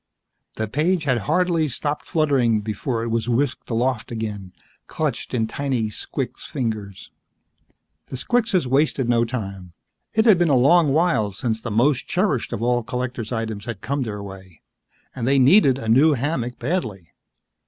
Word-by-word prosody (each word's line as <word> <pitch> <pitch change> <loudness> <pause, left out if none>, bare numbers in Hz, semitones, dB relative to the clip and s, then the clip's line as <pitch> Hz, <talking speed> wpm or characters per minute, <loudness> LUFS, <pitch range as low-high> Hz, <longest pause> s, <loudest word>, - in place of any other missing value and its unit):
The 110 - -2
page 155 - 0
had 130 -5 +1
hardly 170 -1 +2
stopped 145 +3 -3
fluttering 135 - +2
before 115 +3 -3
it 115 - -3
was 115 +1 -1
whisked 130 +2 -1
aloft 120 0 -1
again, 105 -5 -5 0.4
clenched - - -3
in 115 -3 0
tiny 125 -2 -2
squix 105 - -5
fingers. 105 -6 -4 1.0
The 130 - -6
squixes 215 - +1
wasted 135 0 +1
no 120 -1 +3
time. 100 -7 -6 0.4
It 220 +1 +3
had 210 -6 +6
been 175 -2 +3
a 140 - +4
long 145 +4 +5
while 155 - +2
since 110 +2 -2
the 120 - -5
most 120 +6 +1
cherished 185 - 0
of 110 - -3
all 120 0 +2
collector's 125 0 -4
items 110 -3 -3
had 115 -5 -6
come 140 +1 -2
their 105 -4 -4
way 95 -4 -12 0.5
and 125 -2 -3
they 135 +1 +3
needed 135 0 +5
a 115 - -6
new 140 +8 +5
hammock 130 -2 -2
badly. 120 - -3
125 Hz, 160 wpm, -22 LUFS, 110-145 Hz, 1.0 s, had